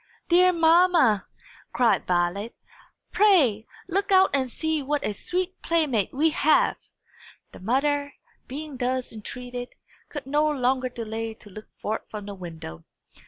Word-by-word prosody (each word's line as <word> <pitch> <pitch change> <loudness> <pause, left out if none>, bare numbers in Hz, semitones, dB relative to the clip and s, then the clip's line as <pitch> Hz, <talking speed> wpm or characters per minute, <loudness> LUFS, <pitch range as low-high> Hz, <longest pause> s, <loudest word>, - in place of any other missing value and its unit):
"Dear 365 +1 +6
mamma!" 330 - +4 0.5
cried 235 -3 +2
Violet, 180 +5 0 0.6
"pray 290 - +3 0.2
look 395 +3 -1
out 380 0 +5
and 265 -2 +1
see 315 +4 -2
what 290 +2 -2
a 210 - -1
sweet 365 - -3
playmate 295 - +1
we 310 +4 +2
have!" 305 +1 +3 0.7
The - - -12
mother, 285 +7 0 0.3
being 290 +1 -7
thus 255 0 -2
entreated, 245 +3 -7 0.3
could 290 -4 -7
no 295 +3 +2
longer 255 -2 0
delay 225 -2 -5
to 210 -2 -16
look 215 +3 -11
forth 215 +1 -2
from 210 -2 -7
the 205 - -6
window. 165 - -9
260 Hz, 135 wpm, -25 LUFS, 220-315 Hz, 0.7 s, Dear